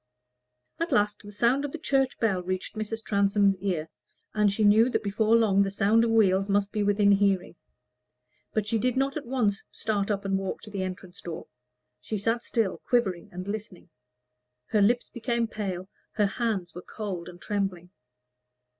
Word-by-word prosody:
At 335 +1 -1
last 205 0 +2
the 205 - -11
sound 235 +7 +2
of 290 - -3
the - - -3
church 270 -3 0
bell 200 -5 +1
reached 185 +3 -4
Mrs. 220 +1 -4
Transome's 200 -1 +3
ear, 180 -5 -2 0.5
and 210 -1 +3
she 215 +2 0
knew 215 +4 +6
that - - -1
before 215 +2 +2
long 210 -4 +4
the 195 - +2
sound 205 +3 +3
of 230 - +1
wheels 195 -3 +3
must 200 0 +1
be 210 - -1
within 205 0 +3
hearing; 195 -3 +2 1.0
but 215 -2 0
she 225 +1 +1
did 250 +2 0
not 270 +1 +1
at 295 -5 -5
once 230 -6 0
start 205 -2 -1
up 200 -1 -1
and 195 0 +1
walk 195 -1 -4
to 215 - -10
the 200 -2 -3
entrance 185 -1 -6
door. 170 -2 -6 0.5
She 215 - -4
sat 225 +4 0
still, 225 -5 -1
quivering 200 -8 +1
and 180 +2 -7
listening; 200 -4 -6 0.8
her 210 - +2
lips 240 +4 +3
became 235 0 -1
pale, 190 -4 -4 0.3
her 210 -1 +2
hands 200 -4 -2
were 180 - -7
cold 185 -4 -6
and 175 0 -12
trembling. 195 -4 -3
205 Hz, 180 wpm, -27 LUFS, 195-225 Hz, 1.0 s, knew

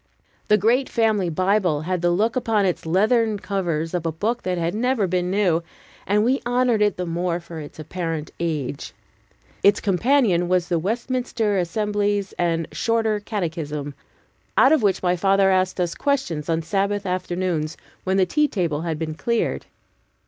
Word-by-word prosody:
The 210 - +5
great 240 +6 +2
family 215 -5 +1
Bible 185 -2 +1
had 180 +2 -2
the 175 - +2
look 210 +7 +1
upon 225 -5 +1
its 180 -3 -2
leathern 215 +5 +2
covers 175 -5 -2
of 175 -2 -1
a 165 - -1
book 220 +9 -2
that 180 -1 -2
bad 170 0 -1
never 240 0 +1
been 180 0 -1
new, 185 -4 +2 0.5
and 210 +2 +3
we 255 +4 +1
honored 245 -2 +2
it 210 -3 +2
the 180 - -2
more 175 +1 -1
for 170 -1 -9
its 145 -1 -10
apparent 160 -1 -4
age. 150 -5 -3 0.7
Its 200 +1 +5
companion 200 -3 +2
was 180 -1 +1
the 170 -2 +1
Westminster 230 +2 -1
Assembly's 205 +2 -1
and 165 -2 0
Shorter 225 -2 0
Catechism, 160 -8 -4 0.6
out 265 - +6
of 315 - +4
which 195 -3 +1
my 180 0 +2
father 195 +1 +3
asked 185 0 +1
us 175 -2 0
questions 260 - -1
on 165 0 0
Sabbath 200 +4 -1
afternoons, 180 -3 -2 0.3
when 190 +1 0
the 190 - +4
tea 300 - +2
table 170 - -1
had 165 -2 -2
been 155 0 -3
cleared. 235 +8 -1
185 Hz, 165 wpm, -23 LUFS, 170-215 Hz, 0.7 s, out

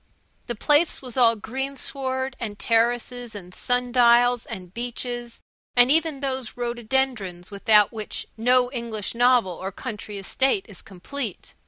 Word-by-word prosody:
The 240 - -2
place 295 +7 +2
was 250 -3 -6
all 235 -3 +5
greensward, 265 +2 -3
and 210 -4 -4
terraces, 240 +1 0
and 180 -3 -9
sun 245 +3 -1
dials, 245 -1 +4
and 185 -6 -8
beeches, 240 0 -5 0.3
and 245 +1 +6
even 315 -3 +2
those 260 -4 -3
rhododendrons 235 -6 -2
without 210 +1 +4
which 215 -2 -4
no 245 +2 +3
English 230 -5 -4
novel 245 -4 +4
or 190 +2 -5
country 210 -1 -7
estate 270 - +1
is 200 -5 -11
complete. 220 +3 -7
240 Hz, 135 wpm, -24 LUFS, 215-260 Hz, 0.3 s, and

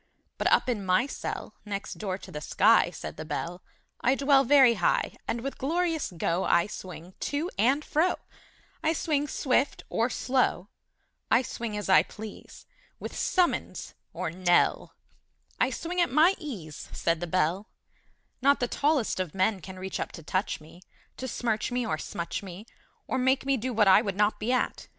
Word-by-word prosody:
But - - +1
up - - +4
in 230 -5 -1
my 185 +5 +3
cell 280 - -5
Next 200 -2 -5
door 190 -3 -2
to - - -12
the 150 - -6
sky, - - +4
Said - - -8
the 155 - -5
Bell, 170 +3 -4 0.4
I 260 +2 +4
dwell 275 0 +4
Very 270 -2 +6
high; - - +1
And 235 - -2
with 275 +2 -5
glorious 325 - 0
go 170 +3 0
I 170 - +3
swing 185 -3 -9
to 305 +5 -2
and 265 +8 +2
fro; 330 +5 +2 0.7
I 320 - +2
swing 295 -2 0
swift 270 0 0
or 230 +2 +1
slow, 250 -8 0 0.6
I - - +4
swing 230 -3 -4
as 205 - -4
I 190 - +7
please, 215 -1 -10 0.3
With - - -7
summons 360 -2 0 0.2
or - - -3
knell; 175 0 +2 0.6
I - - +3
swing 355 +2 -2
at 345 - +2
my 315 +7 +5
ease, 185 - -7
Said 165 -1 0
the 175 - -4
Bell: 185 +4 0 0.7
Not 280 +2 +4
the 245 - 0
tallest 285 -6 +1
of 185 -3 -3
men 190 +2 +2
Can 185 +3 -9
reach 190 0 -5
up - - -3
to 165 - -9
touch 185 +6 -1
me, 160 +3 -15 0.4
To 260 - -4
smirch 225 -2 -1
me 245 0 0
or 155 -5 -2
smutch 170 +1 -4
me, 195 +1 -9 0.4
Or 260 - -1
make 260 +1 +2
me 275 0 +2
do 255 +1 -3
what 215 -3 +3
I 190 +2 +7
would 200 -4 -3
not 210 +1 +2
be 220 +3 -1
at! 255 - -1
220 Hz, 180 wpm, -28 LUFS, 185-275 Hz, 0.7 s, I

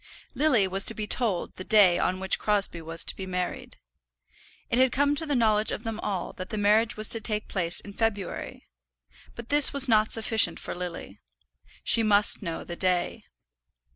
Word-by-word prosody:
Lily 260 -8 +2
was 190 +1 -3
to 225 - +1
be 215 - -4
told 210 -4 0
the 185 - -7
day 195 -4 +4
on 185 +1 -2
which 190 0 0
Crosbie 200 -5 -1
was 165 +1 -3
to - - -3
be 190 - -8
married. 180 -1 -5 0.9
It 240 - +1
had 260 -1 +3
come 285 +3 +1
to 315 +2 -3
the 290 - -1
knowledge 215 -3 +1
of 215 - -6
them 225 -2 -6
all 195 -5 -5
that 185 0 -8
the 215 - -5
marriage 215 +2 +1
was 215 0 +2
to 225 - +4
take 210 0 -3
place 175 -3 0
in 200 - -8
February. 205 -3 -5 0.7
But 235 0 -11
this 290 -1 +7
was 275 -1 +6
not 215 -2 +2
sufficient 225 0 +2
for - - -7
Lily. 180 -1 -8 0.6
She 230 - +3
must 210 -1 +2
know 170 -4 -6
the 175 - -8
day. 180 0 -1
210 Hz, 190 wpm, -25 LUFS, 185-230 Hz, 0.9 s, this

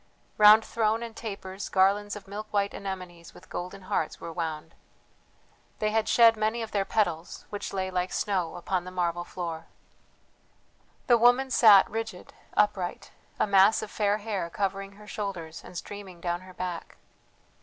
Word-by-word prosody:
Round 215 +1 +8
throne 225 0 0
and 230 -1 -8
tapers 195 -3 -6
garlands 200 +2 +2
of 200 -1 -10
milk 210 +2 -6
white 200 -1 0
anemones 180 -3 -7
with - - -16
golden 185 +2 -6
hearts 160 -3 -2
were 165 - -7
wound. 160 -1 -4 1.0
They 215 0 0
had 220 0 +1
shed 230 -1 +6
many 220 +2 -1
of 220 - -7
their 200 -2 0
petals, 175 -7 -1
which 205 - -5
lay 190 -1 -2
like 180 0 -1
snow 185 -5 -1
upon 180 +1 -2
the 185 - -7
marble 175 -1 -1
floor. 165 -2 -6 1.4
The 240 -3 +5
woman 245 +3 +4
sat 210 -6 +7
rigid, 225 -4 -6 0.2
upright, 190 -4 0 0.3
a - - +4
mass 200 +2 +5
of 215 - -7
fair 205 -1 +1
hair 205 -5 -3
covering 195 +1 -3
her 210 +1 -15
shoulders 195 -7 -5
and 180 - -10
streaming 195 -2 -8
down 175 0 -2
her 185 0 -13
back. 180 -2 -5
195 Hz, 160 wpm, -28 LUFS, 180-215 Hz, 1.4 s, Round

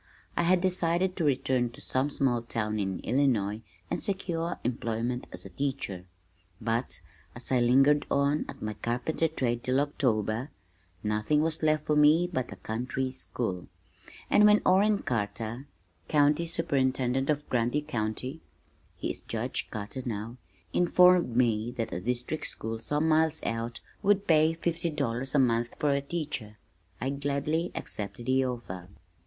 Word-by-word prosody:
I - - +2
had 175 +1 +3
decided 180 0 +2
to 170 - -1
return 130 -3 +1
to - - -13
some 130 +3 0
small 130 -4 +1
town 110 -2 -1
in 95 -2 -2
Illinois 110 -5 +1 0.3
and - - -1
secure 175 -4 -1
employment 120 +1 -2
as - - -5
a - - -9
teacher, 130 -10 -3 0.5
but 115 +2 -1 0.3
as 120 +2 -2
I 130 - +4
lingered 135 +5 +4
on 140 +2 +2
at - - -8
my 110 0 -2
carpenter 125 +9 -1
trade 120 -6 -1
till 130 +1 +2
October 125 -4 0 0.5
nothing 105 +8 +1
was 160 0 +1
left 155 -1 +2
for 150 - +2
me 150 +3 +6
but 130 -5 -2
a - - -6
country 125 +4 -3
school, 115 -8 -3 0.6
and 210 - +5
when 210 0 +5
Orrin 200 +2 +4
Carter, 115 +1 -3 0.4
county 150 +3 +3
superintendent 135 -5 0
of 150 -1 0
Grundy 125 +4 +1
County, 120 +5 -3 0.6
(he - - -2
is - - -7
Judge - - -3
Carter 110 +5 -5
now) 115 +1 -4 0.4
informed 180 -6 +5
me 115 -2 +2
that 115 - -2
a - - -2
district 125 +8 -2
school 110 0 -4
some 150 +7 0
miles 160 0 +2
out 115 +1 -3 0.2
would 200 0 +3
pay 160 -1 +4
fifty 170 0 -1
dollars 135 -2 -2
a - - +5
month 120 -3 +2
for 150 - +1
a 140 0 +1
teacher, 140 -8 -4 0.4
I 135 - -1
gladly 145 +4 -1
accepted 105 +3 -5
the 130 0 +3
offer. 95 -8 -5
130 Hz, 150 wpm, -29 LUFS, 115-155 Hz, 0.6 s, me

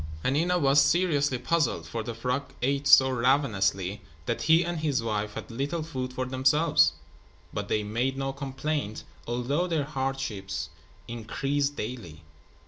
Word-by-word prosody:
Hanina 165 +7 +2
was 140 -1 +5
seriously 145 -4 +2
puzzled, 125 - 0
for 115 +8 -4
the 115 +1 -5
frog 125 +4 -2
ate 140 +2 +1
so 130 -2 +7
ravenously 105 -7 +1 0.2
that - - -2
he 160 +3 +4
and 175 -1 -2
his 145 -6 0
wife 105 -2 -2
had - - -7
little 140 +7 -2
food 130 -5 -4
for 130 0 -3
themselves. 130 - +3 0.6
But - - -3
they 105 - 0
made 120 +6 -1
no 135 0 -2
complaint, 140 -3 -3 0.2
although 125 +9 0
their 160 -4 0
hardships 135 -9 -3 0.4
increased 135 +5 -2
daily. 105 - -6
130 Hz, 140 wpm, -27 LUFS, 115-145 Hz, 0.6 s, so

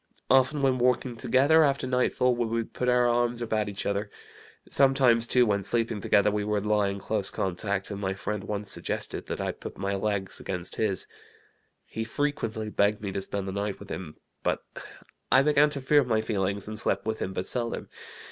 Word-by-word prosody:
Often 135 +2 +4
when 130 -2 +2
walking 125 0 +1
together 140 +7 +4
after 140 -2 +1
night 125 0 +1
fall 125 -1 +3
we 120 -1 -1
would 115 0 -3
put 125 - -1
our 125 0 +4
arms 120 0 +1
about 110 -3 -1
each 100 - -5
other. 100 +1 -1 0.6
Sometimes, 130 -4 +4
too, 125 0 +4
when 100 -2 +1
sleeping 115 +1 -1
together 105 +2 +3
we 105 0 -1
would 105 -1 -1
lie 105 -1 +2
in 100 0 -3
close 100 0 -1
contact, 100 +2 -2
and 100 0 -5
my 95 -1 -1
friend 100 +2 -4
once 105 -1 -3
suggested - - -3
that - - -4
I - - -1
put - - -9
my 100 +1 -2
legs 100 -1 -2
against 90 -2 -4
his. 105 -4 0 0.8
He 110 - -4
frequently 110 -4 -2
begged 105 +1 +1
me 100 - -3
to 95 - -3
spend 100 0 -4
the - - -3
night 100 +1 -3
with 100 - -10
him; 85 -5 -6 0.2
but - - -1 0.7
I 130 - +6
began 150 0 +4
to 145 -1 -3
fear 145 +2 +4
my 115 -3 +1
feelings, 100 -2 -1
and 110 0 -3
slept 100 -2 0
with 110 0 -2
him 95 - -3
but 95 -1 -3
seldom. 120 +1 -2
110 Hz, 200 wpm, -27 LUFS, 100-125 Hz, 0.8 s, I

